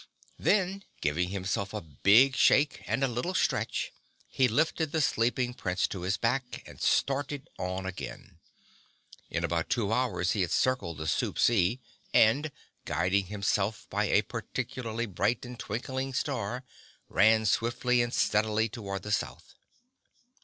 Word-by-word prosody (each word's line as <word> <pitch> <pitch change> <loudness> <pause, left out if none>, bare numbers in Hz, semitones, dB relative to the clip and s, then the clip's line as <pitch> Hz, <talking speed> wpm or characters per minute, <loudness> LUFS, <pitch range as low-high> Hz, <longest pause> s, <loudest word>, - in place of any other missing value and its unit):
Then, 195 -1 +1 0.2
giving 85 +5 0
himself 100 +1 -3
a - - -1
big 105 - +4
shake 140 +3 +4
and 135 - 0
a - - +4
little 125 +10 -3
stretch, - - 0 0.3
he 130 - +2
lifted 155 +5 +1
the 160 - 0
sleeping 125 -2 +1
Prince 95 -6 -1
to 95 - -5
his 95 +3 0
back 125 +2 -1
and - - -13
started 140 0 0
on 95 +1 -3
again. 95 -1 -7 0.9
In - - -2
about 85 -1 -1
two 110 -3 0
hours 100 -8 0
he 105 - 0
had 90 - 0
circled 100 - 0
the 80 - -5
Soup - - -1
Sea 115 +1 +3 0.4
and, 140 +8 +4 0.3
guiding 90 +3 +1
himself 100 +1 -1
by - - +1
a - - +3
particularly 120 -2 -4
bright 105 +4 -1
and 125 -1 -9
twinkling 130 +4 -4
star, 125 -3 -2 0.4
ran 110 +1 +4
swiftly 120 +3 +2
and 120 0 -1
steadily 110 0 +1
toward 100 -4 -5
the 105 - -5
South. - - -3
115 Hz, 145 wpm, -29 LUFS, 100-130 Hz, 0.9 s, big